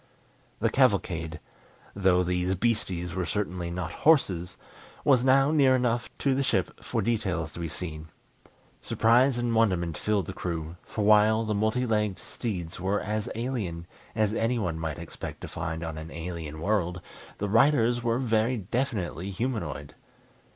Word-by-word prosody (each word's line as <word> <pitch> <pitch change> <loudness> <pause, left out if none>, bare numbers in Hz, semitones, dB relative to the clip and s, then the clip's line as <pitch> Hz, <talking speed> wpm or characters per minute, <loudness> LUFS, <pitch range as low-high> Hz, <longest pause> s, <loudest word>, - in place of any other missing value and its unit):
The - - +2
cavalcade 85 0 +1 0.5
though 95 -2 +3
these 90 +1 0
beasties 95 -5 -1
were 95 - -1
certainly 90 0 -2
not 85 -1 -4
horses 95 - +2 0.5
was 130 -4 +5
now 135 +2 +5
near 135 -4 +5
enough 120 -1 0
to 140 - +1
the 135 - +1
ship 95 -9 -1
for - - -1
details 95 -9 -1
to - - -9
be 85 - -2
seen. 80 -1 -6 0.7
Surprise 120 +3 +3
and 120 -1 0
wonderment 90 -8 +1
filled 105 -4 +1
the - - -6
crew, 85 -2 -4
for 105 - -2
while 110 +1 +5
the 110 - 0
multi 110 +4 +1
legged 105 -4 0
steeds 90 -9 -5
were 95 +3 0
as 110 +3 -2
alien 110 -9 -3 0.3
as 110 -2 +2
anyone 110 -8 0
might 80 -2 -3
expect 85 0 -7
to - - -6
find 80 +1 -4
on 80 -1 -4
an 80 +1 -8
alien 80 -2 -6
world, 90 -2 0 0.4
the 105 - -2
riders 120 +1 +4
were 115 0 +1
very 120 -1 +1
definitely 100 - -2
humanoid. 95 - -3
100 Hz, 150 wpm, -28 LUFS, 85-115 Hz, 0.7 s, was